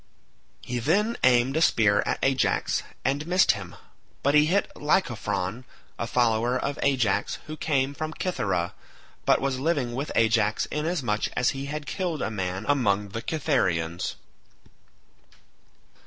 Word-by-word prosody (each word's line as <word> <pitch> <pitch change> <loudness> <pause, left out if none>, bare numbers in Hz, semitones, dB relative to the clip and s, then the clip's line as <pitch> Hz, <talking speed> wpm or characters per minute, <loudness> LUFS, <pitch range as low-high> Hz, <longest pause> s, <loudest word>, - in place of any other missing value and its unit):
He 125 0 -3
then 200 - +1
aimed 125 +2 +4
a 160 - +2
spear 105 -9 +4
at - - 0
Ajax, 135 -1 +1 0.2
and 145 +3 0
missed 180 +2 +5
him, 100 -4 -7 0.5
but 140 - +3
he 150 0 +5
hit 195 +5 +1
Lycophron 110 - -1 0.4
a 115 - -2
follower 120 0 +2
of 140 +2 -3
Ajax, 115 -8 +1
who 155 - -6
came 140 -3 0
from 155 +2 -4
Cythera, 95 - -1 0.5
but - - +5
was 135 -1 -1
living 140 -5 0
with 140 +5 -3
Ajax 110 -2 +2
inasmuch 150 -9 -1
as 125 - +3
he 135 +1 -5
had 150 0 -5
killed 170 +2 -2
a - - -2
man 95 -2 -3
among 105 -8 +1
the 115 +3 -5
Cythereans. 95 - -1
130 Hz, 140 wpm, -26 LUFS, 105-150 Hz, 0.5 s, missed